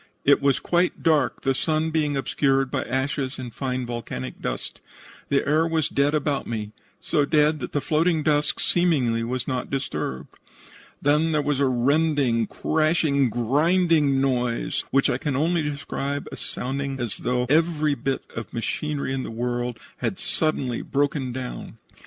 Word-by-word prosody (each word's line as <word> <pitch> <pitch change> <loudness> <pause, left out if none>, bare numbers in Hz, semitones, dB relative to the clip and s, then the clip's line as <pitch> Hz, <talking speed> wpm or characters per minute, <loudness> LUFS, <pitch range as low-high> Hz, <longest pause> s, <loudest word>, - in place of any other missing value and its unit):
It 140 0 +5
was 140 -1 +3
quite 175 +1 0
dark, 155 -3 +2
the 135 - +2
sun 155 +3 0
being 150 -3 +1
obscured 135 -1 +1
by - - 0
ashes 130 0 -2
and 125 -3 -7
fine 130 -2 -2
volcanic 115 - -5
dust. - - -4 0.5
The 140 - +1
air 155 +3 +3
was 160 -2 0
dead 140 +2 +2
about 145 -2 -1
me, 105 -2 -4 0.3
so 150 -4 +1
dead 150 +1 +3
that - - -5
the 145 - 0
floating 155 +3 +1
dust 150 -1 +1
seemingly 135 -10 +2
was 125 +2 -3
not 130 -2 -2
disturbed. 135 - -4 0.6
Then 150 +3 +3
there 150 - +2
was 145 -2 0
a 140 - +3
rending, 130 -2 +2
crashing, 155 -4 +1
grinding 145 - +2
noise, 125 -3 0
which 135 0 +3
I 120 - 0
can 145 -2 -2
only 165 +4 +2
describe 145 -1 -3
as - - -6
sounding 135 +1 -3
as 120 -4 -3
though 125 0 0
every 155 0 +2
bit 135 -1 -2
of 115 - -6
machinery 140 +4 -2
in 135 - -1
the - - -5
world 120 +1 -2 0.2
had - - -2
suddenly 135 -6 -1
broken 140 -2 -1
down. 125 0 -6
140 Hz, 160 wpm, -24 LUFS, 125-155 Hz, 0.6 s, It